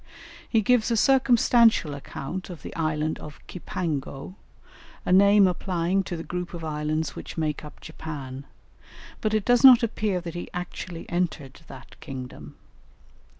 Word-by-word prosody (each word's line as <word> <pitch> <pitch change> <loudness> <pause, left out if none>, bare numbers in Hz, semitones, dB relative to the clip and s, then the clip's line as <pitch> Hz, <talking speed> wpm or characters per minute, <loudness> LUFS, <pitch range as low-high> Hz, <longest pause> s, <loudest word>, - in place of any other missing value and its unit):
He 225 - +3
gives 240 +1 +3
a 230 - +1
circumstantial 235 - +4
account 140 +6 -6
of 175 -3 -9
the - - -8
Island 155 -1 -1
of 150 -1 -10
Cipango, 160 -4 -4 0.7
a - - +2
name 200 +1 +6
applying 180 0 0
to 175 - -4
the 165 - -6
group 175 +2 -5
of 165 - -7
islands 155 0 -2
which - - -8
make 155 -2 -2
up 150 - -11
Japan; 140 -4 -7 0.8
but 215 0 0
it 215 - 0
does 245 +1 +4
not 255 -2 +9
appear 210 -4 0
that 170 -1 -7
he 175 - -6
actually 180 -1 -6
entered 165 -6 -3
that - - -13
kingdom. 125 - -8
175 Hz, 150 wpm, -25 LUFS, 150-200 Hz, 0.8 s, not